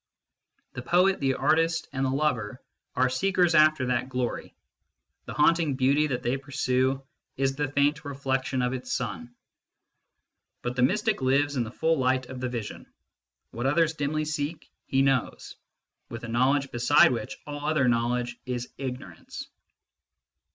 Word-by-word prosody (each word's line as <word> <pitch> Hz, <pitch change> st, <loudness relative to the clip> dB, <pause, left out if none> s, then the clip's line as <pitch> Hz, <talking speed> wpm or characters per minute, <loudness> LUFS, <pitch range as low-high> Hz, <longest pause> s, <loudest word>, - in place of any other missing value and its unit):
The -, -, -5 dB
poet, 180 Hz, +8 st, +3 dB
the 135 Hz, -2 st, +1 dB
artist, 165 Hz, +4 st, +1 dB
and 135 Hz, 0 st, -1 dB
the 135 Hz, -, +1 dB
lover 130 Hz, -5 st, -1 dB, 0.4 s
are 130 Hz, -1 st, +3 dB
seekers 180 Hz, +6 st, +2 dB
after 155 Hz, -4 st, +5 dB
that 125 Hz, +1 st, -1 dB
glory: 125 Hz, -2 st, -3 dB, 0.7 s
the -, -, -7 dB
haunting 155 Hz, -1 st, +3 dB
beauty 140 Hz, +3 st, +3 dB
that 125 Hz, -4 st, -3 dB
they 125 Hz, +3 st, 0 dB
pursue 135 Hz, -1 st, 0 dB, 0.3 s
is 135 Hz, 0 st, 0 dB
the 145 Hz, 0 st, -1 dB
faint 145 Hz, +1 st, +1 dB
reflection 135 Hz, -2 st, -2 dB
of 125 Hz, +1 st, 0 dB
its 125 Hz, -1 st, -5 dB
sun. 120 Hz, +1 st, -4 dB, 1.3 s
But 120 Hz, 0 st, -3 dB
the 125 Hz, -, 0 dB
mystic 210 Hz, -, +1 dB
lives 140 Hz, +2 st, +2 dB
in 125 Hz, -, +1 dB
the 110 Hz, -, -6 dB
full 160 Hz, +5 st, 0 dB
light 130 Hz, 0 st, +1 dB
of 130 Hz, -, -7 dB
the 125 Hz, -, -1 dB
vision: 120 Hz, -4 st, -6 dB, 0.6 s
what 120 Hz, +3 st, -2 dB
others 160 Hz, +3 st, +2 dB
dimly 155 Hz, 0 st, -1 dB
seek 150 Hz, +1 st, -4 dB, 0.2 s
he 135 Hz, 0 st, +2 dB
knows, 135 Hz, -3 st, -1 dB, 0.5 s
with 115 Hz, 0 st, -7 dB
a -, -, -5 dB
knowledge 130 Hz, +4 st, +1 dB
beside 120 Hz, +3 st, +5 dB
which 125 Hz, +2 st, -4 dB
all 145 Hz, 0 st, -6 dB
other 155 Hz, -4 st, +2 dB
knowledge 120 Hz, 0 st, 0 dB
is 125 Hz, -1 st, -3 dB
ignorance. 125 Hz, -10 st, -7 dB
135 Hz, 150 wpm, -27 LUFS, 125-150 Hz, 1.3 s, after